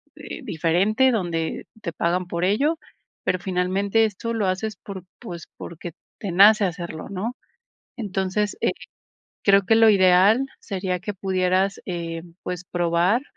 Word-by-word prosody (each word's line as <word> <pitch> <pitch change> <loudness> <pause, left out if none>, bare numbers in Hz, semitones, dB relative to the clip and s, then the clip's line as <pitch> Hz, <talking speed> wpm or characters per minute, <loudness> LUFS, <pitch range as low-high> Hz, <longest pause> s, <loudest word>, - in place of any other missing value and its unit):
eh, - - -8
diferente, 195 - +2
donde 170 -7 -2
te 170 -5 -4
pagan 175 +2 0
por 170 0 -3
ello, 280 - +2 0.5
pero 185 - 0
finalmente 190 +4 +1
esto 220 +2 -3
lo 215 -4 0
haces 195 +3 -2
por, 190 -2 -8 0.2
pues, 175 -9 -8
porque 170 0 -8 0.3
te 200 - -4
nace 205 +4 +7
hacerlo, 170 -3 -5
¿no? 205 +5 -4 0.6
Entonces, 205 -1 -1
eh, - - +3 0.7
creo 200 -1 +6
que 225 - +5
lo 225 -1 +7
ideal 195 +6 +5
sería 185 -3 -3
que 205 +3 -5
pudieras, 190 0 0
eh, 170 -2 -4 0.2
pues, 180 0 -5
probar 175 +6 +1
190 Hz, 140 wpm, -23 LUFS, 175-210 Hz, 0.7 s, nace